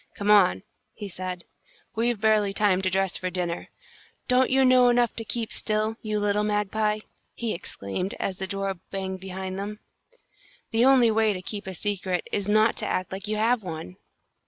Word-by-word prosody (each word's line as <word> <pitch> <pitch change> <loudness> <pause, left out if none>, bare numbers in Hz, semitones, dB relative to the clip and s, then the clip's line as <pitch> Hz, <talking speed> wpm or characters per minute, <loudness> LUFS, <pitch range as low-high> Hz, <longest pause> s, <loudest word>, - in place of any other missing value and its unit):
"Come 205 +1 +1
on," 180 - +5 0.3
he 205 - -6
said. 185 -1 -6 0.5
"We've 235 0 0
barely 215 -2 +3
time 200 -2 +2
to 185 - +1
dress 190 0 0
for 185 - -3
dinner. 180 -2 -3 0.6
Don't 255 0 +3
you 265 0 +4
know 255 -1 +6
enough 240 -1 +2
to 225 - -3
keep 225 0 -2
still, 215 +1 0
you 215 -1 -1
little 205 0 +1
magpie?" 210 +1 0 0.3
he 230 -2 -2
exclaimed, 170 - -4
as 190 -1 -3
the 190 - -2
door 195 0 -2 0.2
banged 190 -1 -4
behind 190 0 -5
them. 210 +1 -5 0.9
"The 230 +1 +4
only 255 -4 +6
way 220 -1 +3
to 185 - -6
keep 205 +1 -5
a 190 - -5
secret 185 -2 -2
is 205 -1 -1
not 215 +2 +3
to - - -2
act 185 0 -2
like 195 +2 -5
you 215 - -1
have 225 +2 +2
one!" 160 - -7
205 Hz, 180 wpm, -26 LUFS, 190-220 Hz, 0.9 s, know